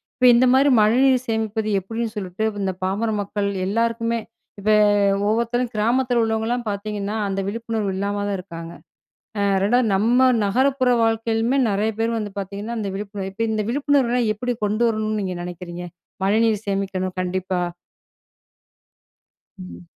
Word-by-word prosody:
இப்ப 250 Hz, -, +4 dB
இந்த 250 Hz, -, +5 dB
மாதிரி 275 Hz, +2 st, +5 dB
மழைநீர் 255 Hz, +4 st, +3 dB
சேமிப்பது 220 Hz, -1 st, -1 dB
எப்படின்னு 225 Hz, +4 st, -4 dB
சொல்லிட்டு 190 Hz, 0 st, -4 dB, 0.2 s
இந்த 190 Hz, -1 st, 0 dB
பாமர 200 Hz, +5 st, 0 dB
மக்கள் 200 Hz, 0 st, -2 dB, 0.2 s
எல்லாருக்குமே, 230 Hz, +3 st, 0 dB, 0.4 s
இப்ப 205 Hz, +2 st, -1 dB, 0.6 s
ஒவ்வொருத்தரும் 235 Hz, +2 st, 0 dB
கிராமத்தில 240 Hz, +3 st, +2 dB
உள்ளவங்கலாம் 225 Hz, +2 st, -1 dB
பார்த்தீங்கன்னா, 205 Hz, 0 st, -3 dB
அந்த 195 Hz, 0 st, -2 dB
விழிப்புணர்வு 225 Hz, -1 st, -2 dB
இல்லாம 205 Hz, +1 st, -2 dB
தான் 200 Hz, -1 st, -1 dB
இருக்காங்க. 170 Hz, -2 st, -8 dB, 0.7 s
அ -, -, +1 dB, 0.2 s
2ஆவது 245 Hz, +3 st, +3 dB
நம்ம 245 Hz, +6 st, +4 dB, 0.2 s
நகரப்புற 260 Hz, +4 st, +2 dB
வாழ்க்கையிலயுமே 225 Hz, +3 st, +1 dB
நிறைய 210 Hz, +3 st, +1 dB
பேர் 230 Hz, +1 st, 0 dB
வந்து 210 Hz, -2 st, -4 dB
பார்த்தீங்கன்னா, 200 Hz, +4 st, -5 dB
அந்த 210 Hz, -2 st, -3 dB
விழிப்புணர்வு 200 Hz, -1 st, -5 dB
இப்ப 225 Hz, +4 st, -2 dB
இந்த 215 Hz, -1 st, -1 dB
விழிப்புணர்வுலாம் 255 Hz, -4 st, +1 dB
எப்டி 245 Hz, +3 st, -2 dB
கொண்டு 210 Hz, +3 st, 0 dB
வரணும்ன்னு 215 Hz, -1 st, -1 dB
நீங்க 185 Hz, -2 st, -3 dB
நெனைக்கிறீங்க? 175 Hz, 0 st, -7 dB, 0.4 s
மழைநீர் 220 Hz, +1 st, +2 dB
சேமிக்கணும் 195 Hz, -2 st, -2 dB
கண்டிப்பா. 185 Hz, 0 st, -2 dB, 2.0 s
ம். 90 Hz, -1 st, -10 dB
215 Hz, 130 wpm, -22 LUFS, 195-235 Hz, 2.0 s, இந்த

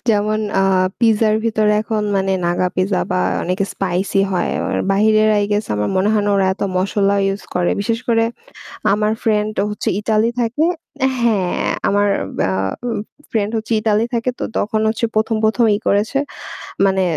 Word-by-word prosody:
যেমন 215 Hz, 0 st, +1 dB, 0.2 s
আ -, -, +3 dB, 0.4 s
পিজ্জার 220 Hz, -2 st, +3 dB
ভিতরে 215 Hz, -2 st, +2 dB
এখন 215 Hz, -1 st, -2 dB
মানে 190 Hz, 0 st, 0 dB
নাগা 175 Hz, +1 st, +1 dB
পিজ্জা 185 Hz, 0 st, +1 dB
বা 185 Hz, 0 st, +1 dB, 0.2 s
অনেকে 185 Hz, +3 st, -1 dB
স্পাইসি 195 Hz, +1 st, 0 dB
হয়। 180 Hz, -2 st, 0 dB
অ -, -, -2 dB, 0.3 s
বাহিরের 215 Hz, +2 st, +3 dB
আই 205 Hz, -, +2 dB
গেস 210 Hz, +1 st, +1 dB
আমার 105 Hz, 0 st, -1 dB
মনে 190 Hz, +2 st, +2 dB
হয় 215 Hz, -1 st, +2 dB
না -, -, +2 dB
ওরা 195 Hz, -1 st, +2 dB
এত -, -, -7 dB
মশলা 200 Hz, +2 st, +1 dB, 0.2 s
use 195 Hz, -, -8 dB
করে। 180 Hz, -1 st, +1 dB
বিশেষ 225 Hz, +3 st, -1 dB
করে 225 Hz, -1 st, +3 dB, 0.7 s
আমার 210 Hz, +1 st, +1 dB
ফ্রেন্ড 215 Hz, -1 st, +1 dB, 0.2 s
হচ্ছে 210 Hz, -, -3 dB
ইতালি 220 Hz, +1 st, +1 dB
থাকে। 245 Hz, +6 st, 0 dB, 0.6 s
হ্যাঁ, 210 Hz, -6 st, +1 dB, 0.2 s
আমার 205 Hz, +1 st, +2 dB, 0.3 s
বা -, -, +1 dB, 0.4 s
অ -, -, -1 dB, 0.4 s
ফ্রেন্ড 215 Hz, -2 st, 0 dB
হচ্ছে 225 Hz, +1 st, -3 dB
ইতালি 215 Hz, 0 st, +2 dB
থাকে 235 Hz, +2 st, 0 dB
তো -, -, -3 dB
তখন 215 Hz, +1 st, 0 dB
হচ্ছে 225 Hz, +1 st, -1 dB
১ম 220 Hz, +1 st, +1 dB
১ম 225 Hz, +2 st, +3 dB
ই -, -, -4 dB
করেছে। 210 Hz, +7 st, +1 dB, 0.7 s
মানে 190 Hz, -1 st, +2 dB
210 Hz, 170 wpm, -18 LUFS, 195-220 Hz, 0.7 s, আ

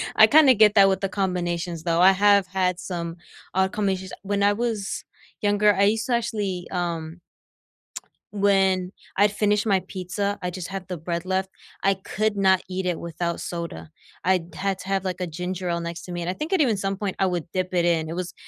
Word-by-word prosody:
I -, -, +8 dB
kinda 295 Hz, -4 st, +7 dB
get 215 Hz, -1 st, +5 dB
that 195 Hz, -2 st, +7 dB
with 190 Hz, -1 st, 0 dB
the 195 Hz, -, -1 dB
combinations 175 Hz, -3 st, -2 dB
though. 170 Hz, 0 st, +1 dB
I 190 Hz, +1 st, +8 dB
have 200 Hz, 0 st, +4 dB
had 180 Hz, -1 st, 0 dB
some 175 Hz, -1 st, -5 dB, 0.4 s
odd 190 Hz, +1 st, +2 dB
combinations. 190 Hz, -2 st, -2 dB
When 200 Hz, 0 st, 0 dB
I 205 Hz, 0 st, +4 dB
was 220 Hz, -3 st, -2 dB, 0.4 s
younger, 205 Hz, 0 st, +3 dB
I 195 Hz, -, +2 dB
used 220 Hz, +3 st, +2 dB
to 250 Hz, -, 0 dB
actually, 205 Hz, -6 st, -2 dB
um 170 Hz, -2 st, -3 dB, 1.1 s
when 195 Hz, -2 st, +2 dB, 0.3 s
I'd 205 Hz, 0 st, +4 dB
finished 210 Hz, 0 st, +1 dB
my 195 Hz, -3 st, +3 dB
pizza, 200 Hz, +2 st, -3 dB
I 180 Hz, -, -2 dB
just 180 Hz, -1 st, -6 dB
had 195 Hz, -2 st, -6 dB
the 180 Hz, -, -3 dB
bread 170 Hz, +2 st, -3 dB
left, 190 Hz, 0 st, -1 dB, 0.3 s
I 195 Hz, -, +4 dB
could 205 Hz, +2 st, -2 dB
not 190 Hz, -1 st, +3 dB
eat 185 Hz, 0 st, -3 dB
it 175 Hz, -2 st, -1 dB
without 170 Hz, +1 st, -3 dB
soda. 170 Hz, -2 st, -6 dB, 0.4 s
I 185 Hz, 0 st, +4 dB
d 170 Hz, 0 st, -13 dB
had 195 Hz, 0 st, -1 dB
to -, -, -9 dB
have, 195 Hz, -1 st, 0 dB
like, 185 Hz, -1 st, -3 dB
a 180 Hz, -, -1 dB
ginger 180 Hz, +2 st, -4 dB
ale 170 Hz, 0 st, 0 dB
next 170 Hz, 0 st, -5 dB
to 180 Hz, -, -8 dB
me, 175 Hz, 0 st, -4 dB
and 170 Hz, -, -3 dB
I -, -, 0 dB
think 305 Hz, -, -5 dB
it 380 Hz, -, +2 dB
even 245 Hz, -7 st, +3 dB
some 195 Hz, 0 st, -2 dB
point 200 Hz, -1 st, -3 dB
I 195 Hz, -, +3 dB
would 175 Hz, -4 st, -1 dB
dip 185 Hz, 0 st, -2 dB
it 175 Hz, -1 st, +2 dB
in. 160 Hz, -2 st, +1 dB
It 165 Hz, -, -4 dB
was 180 Hz, -1 st, -4 dB
190 Hz, 220 wpm, -24 LUFS, 175-200 Hz, 1.1 s, I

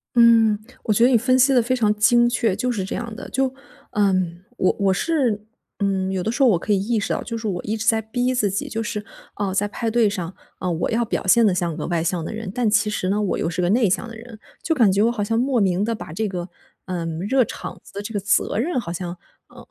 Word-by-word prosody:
嗯， 230 Hz, -2 st, +6 dB, 0.3 s
我 215 Hz, -, +1 dB
觉 230 Hz, -, +3 dB
得 245 Hz, -, +6 dB
你 245 Hz, -, +5 dB
分 255 Hz, +3 st, +2 dB
析 265 Hz, +2 st, +5 dB
得 245 Hz, -, +5 dB
非 255 Hz, +3 st, 0 dB
常 215 Hz, -4 st, +2 dB
精 240 Hz, +3 st, +4 dB
确， 225 Hz, -5 st, +1 dB
就 250 Hz, -, -1 dB
是 210 Hz, -5 st, -2 dB
这 190 Hz, -, -4 dB
样 235 Hz, -2 st, -5 dB
的。 -, -, -8 dB
就 265 Hz, 0 st, 0 dB, 0.4 s
嗯， 185 Hz, -4 st, 0 dB
我 185 Hz, -, +2 dB
我 195 Hz, -1 st, +3 dB
是， 240 Hz, -, 0 dB, 0.3 s
嗯， 190 Hz, -1 st, 0 dB
有 185 Hz, -2 st, -2 dB
的 220 Hz, -, -1 dB
时 275 Hz, -, -3 dB
候 255 Hz, -, +6 dB
我 180 Hz, -, +3 dB
可 205 Hz, +4 st, 0 dB
以 195 Hz, -, +2 dB
意 220 Hz, +2 st, 0 dB
识 -, -, -1 dB
到， -, -, -2 dB
就 230 Hz, -, -5 dB
是 220 Hz, -1 st, -4 dB
我 175 Hz, -3 st, -2 dB
一 215 Hz, +2 st, -2 dB
直 220 Hz, -, -4 dB
在 220 Hz, 0 st, +3 dB
逼 245 Hz, +4 st, -1 dB
自 215 Hz, -5 st, +1 dB
己。 195 Hz, -, -3 dB
就 225 Hz, -, -3 dB
是， 210 Hz, -1 st, -4 dB, 0.3 s
呃， 200 Hz, -2 st, -2 dB
在 205 Hz, +1 st, +1 dB
派 225 Hz, +2 st, -3 dB
对 230 Hz, -2 st, +3 dB
上， 185 Hz, -3 st, -4 dB, 0.3 s
啊， 185 Hz, -, -2 dB
我 165 Hz, 0 st, -1 dB
要 235 Hz, +1 st, +1 dB
表 -, -, -3 dB
现 230 Hz, +4 st, +6 dB
得 200 Hz, -, +3 dB
像 175 Hz, -3 st, -1 dB
个 -, -, -4 dB
外 170 Hz, -2 st, 0 dB
向 170 Hz, -1 st, -1 dB
的 -, -, -5 dB
人， 220 Hz, -3 st, -5 dB
但 245 Hz, -3 st, 0 dB
其 210 Hz, 0 st, +2 dB
实 185 Hz, -3 st, -2 dB
呢， 205 Hz, +2 st, +1 dB
我 205 Hz, -, 0 dB
又 -, -, -1 dB
是 180 Hz, +1 st, -2 dB
个 175 Hz, -, +1 dB
内 225 Hz, +1 st, +3 dB
向 210 Hz, +6 st, -1 dB
的 230 Hz, -, -9 dB
人。 230 Hz, -1 st, -12 dB, 0.2 s
就 325 Hz, -, +1 dB
感 230 Hz, -9 st, +4 dB
觉 200 Hz, +2 st, +2 dB
我 235 Hz, -, +3 dB
好 215 Hz, -4 st, -2 dB
像 225 Hz, +2 st, 0 dB
莫 255 Hz, 0 st, +1 dB
名 190 Hz, 0 st, +1 dB
的 230 Hz, +2 st, 0 dB
把 185 Hz, -, -8 dB
这 215 Hz, +6 st, -2 dB
个， 180 Hz, -2 st, -5 dB, 0.4 s
呃， 175 Hz, -3 st, -3 dB, 0.2 s
热 265 Hz, -2 st, +4 dB
场 -, -, -8 dB
子 -, -, -17 dB
的 200 Hz, -, -4 dB
这 205 Hz, +2 st, -7 dB
个 205 Hz, -, 0 dB
责 200 Hz, +1 st, +1 dB
任 260 Hz, +4 st, 0 dB
好 170 Hz, -7 st, -5 dB
像， 175 Hz, 0 st, -5 dB, 0.3 s
呃， -, -, -19 dB
210 Hz, 295 characters per minute, -22 LUFS, 190-235 Hz, 0.4 s, 嗯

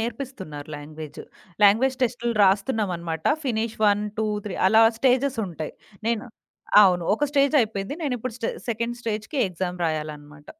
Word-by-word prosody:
నేర్పిస్తున్నారు 225 Hz, -, -6 dB
language. 150 Hz, +1 st, -9 dB, 0.4 s
Language 235 Hz, +6 st, +5 dB
టెస్టులు 240 Hz, -1 st, 0 dB
రాస్తున్నామనమాట. 190 Hz, -, 0 dB, 0.2 s
Finish 230 Hz, -3 st, -1 dB
1, 205 Hz, 0 st, +2 dB, 0.2 s
2, 220 Hz, -, +1 dB, 0.2 s
3 195 Hz, -, -4 dB
అలా 220 Hz, +2 st, +6 dB, 0.2 s
స్టేజెసుంటాయి. 245 Hz, -, 0 dB, 0.4 s
నేను 230 Hz, -1 st, 0 dB, 0.6 s
అవును. 180 Hz, -3 st, +3 dB
ఒక 295 Hz, -, 0 dB
స్టేజయిపోయింది. 275 Hz, -7 st, +2 dB
నేనిప్పుడు 255 Hz, -5 st, -3 dB
స్టే 230 Hz, -, -1 dB, 0.2 s
సెకండ్ 235 Hz, +1 st, -2 dB
స్టేజ్‌కి 220 Hz, +4 st, -3 dB
ఎగ్జామ్ 180 Hz, 0 st, -4 dB
రాయాలనమాట. 150 Hz, -2 st, -5 dB
215 Hz, 120 wpm, -24 LUFS, 175-240 Hz, 0.6 s, అలా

